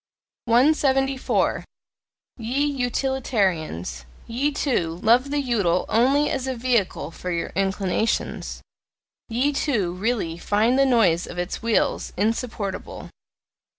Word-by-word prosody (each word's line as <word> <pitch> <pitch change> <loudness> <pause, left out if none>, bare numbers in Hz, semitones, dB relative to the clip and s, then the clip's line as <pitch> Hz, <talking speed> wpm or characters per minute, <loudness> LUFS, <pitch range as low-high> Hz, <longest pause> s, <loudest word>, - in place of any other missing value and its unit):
174. 270 +1 +2 0.7
Ye 250 +5 0
Utilitarians 220 - -1 0.2
ye, 255 +6 0
too, 175 - -1
love 245 +5 +4
the 290 +1 0
UTILE 205 -10 +1
only 270 +6 +3
as 265 -1 -2
a 260 - -2
VEHICLE 230 - 0
for 180 - -7
your 170 -1 -2
inclinations, 195 +2 -1 0.7
ye, 255 +6 +1
too, 220 - 0
really 185 -4 -2
find 220 +8 +2
the 275 - +5
noise 190 -9 +3
of 175 - -9
its 175 +1 -3
wheels 230 -1 0
insupportable! 215 -1 -3
230 Hz, 110 wpm, -23 LUFS, 185-265 Hz, 0.7 s, the